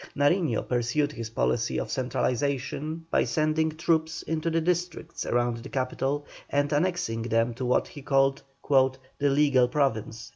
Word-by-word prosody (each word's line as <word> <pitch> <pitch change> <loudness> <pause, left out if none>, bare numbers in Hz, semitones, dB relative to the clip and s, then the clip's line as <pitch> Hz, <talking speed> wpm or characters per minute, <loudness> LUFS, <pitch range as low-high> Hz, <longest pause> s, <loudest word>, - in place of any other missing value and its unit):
Nariño 145 - +2
pursued 125 +5 0
his 115 -5 -6
policy 65 - 0
of - - -4
centralization 140 +5 -1
by - - +3
sending 160 0 +1
troops 160 +1 0
into 160 +1 -1
the 165 0 +1
districts 175 +1 -2
around 120 -1 +1
the 115 - -9
capital 135 +2 -1 0.2
and 145 +1 +1
annexing 160 -8 0
them 115 +1 +1
to 130 +2 -4
what 125 - +2
he 145 - -10
called 135 0 +2 0.3
"the 135 +1 +2
legal 135 -3 +4
province." 115 -4 -1
140 Hz, 145 wpm, -27 LUFS, 125-155 Hz, 0.3 s, legal